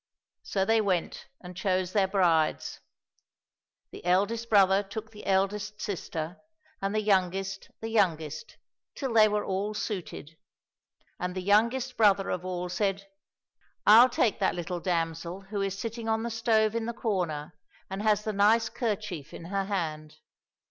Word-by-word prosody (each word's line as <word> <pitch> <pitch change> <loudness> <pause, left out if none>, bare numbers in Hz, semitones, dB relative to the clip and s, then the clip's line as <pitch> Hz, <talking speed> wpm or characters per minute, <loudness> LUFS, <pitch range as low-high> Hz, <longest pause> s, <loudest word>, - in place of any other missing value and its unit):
So 190 -1 -1
they 225 +1 +3
went 185 -5 -2
and 180 0 -10
chose 185 -1 -1
their 200 -2 +3
brides. 175 -5 +1 1.1
The - - -10
eldest 205 +6 +1
brother 195 -2 +5
took 220 +2 -7
the 210 - -11
eldest 200 +2 0
sister, 170 -3 -4 0.4
and 195 +2 -1
the 215 - +1
youngest 195 -1 0
the 225 - -4
youngest, 160 -6 -1 0.4
till 265 -5 -3
they 215 -1 +7
were 210 0 -1
all 200 +3 -2
suited. 180 -7 -5 0.8
And 180 0 -3
the 185 - -3
youngest 230 +6 +2
brother 200 -3 +4
of 180 - -3
all 180 -1 -3
said, 195 +1 -2 0.4
" - - -41
I'll 230 +4 +8
take 235 -3 +1
that 195 - +1
little 175 0 -4
damsel 170 +1 -2
who 200 +1 -4
is 195 0 -2
sitting 230 +1 -4
on 220 0 +1
the 235 - -3
stove 225 -1 +2
in 230 -1 -2
the 235 - -2
corner 180 -10 -2 0.3
and 190 +1 -5
has 210 -1 +2
the 215 - -2
nice 220 +3 +4
kerchief 205 - -4
in 165 - -9
her 195 -1 0
hand." 155 -6 -4
195 Hz, 155 wpm, -28 LUFS, 180-215 Hz, 1.1 s, I'll